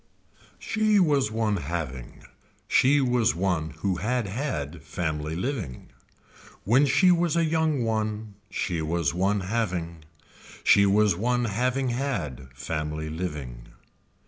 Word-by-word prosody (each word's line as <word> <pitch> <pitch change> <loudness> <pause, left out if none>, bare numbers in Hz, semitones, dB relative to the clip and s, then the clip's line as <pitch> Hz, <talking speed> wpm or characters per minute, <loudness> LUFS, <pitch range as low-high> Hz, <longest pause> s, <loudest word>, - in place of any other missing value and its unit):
She 215 -1 +2
was 145 - +3
one 110 -2 0
having, 75 -6 -5 0.4
she 140 +2 +4
was 125 -6 +2
one 85 -3 0
who 95 -1 0
had 120 +5 -1
had 90 - -4
family 80 0 -3
living. 95 - -4 0.7
When 130 +8 +4
she 180 +8 +5
was 175 -1 +2
a 170 -1 +3
young 160 -4 +1
one 110 -1 -2 0.2
she 85 -4 -2
was 80 0 0
one 100 +3 +1
having, 90 -6 -2 0.6
she 100 0 +6
was 105 -1 +3
one 120 +5 0
having 125 +5 0
had 110 - -3
family 75 +3 -4
living. 75 -8 -5
100 Hz, 120 wpm, -26 LUFS, 80-125 Hz, 0.7 s, she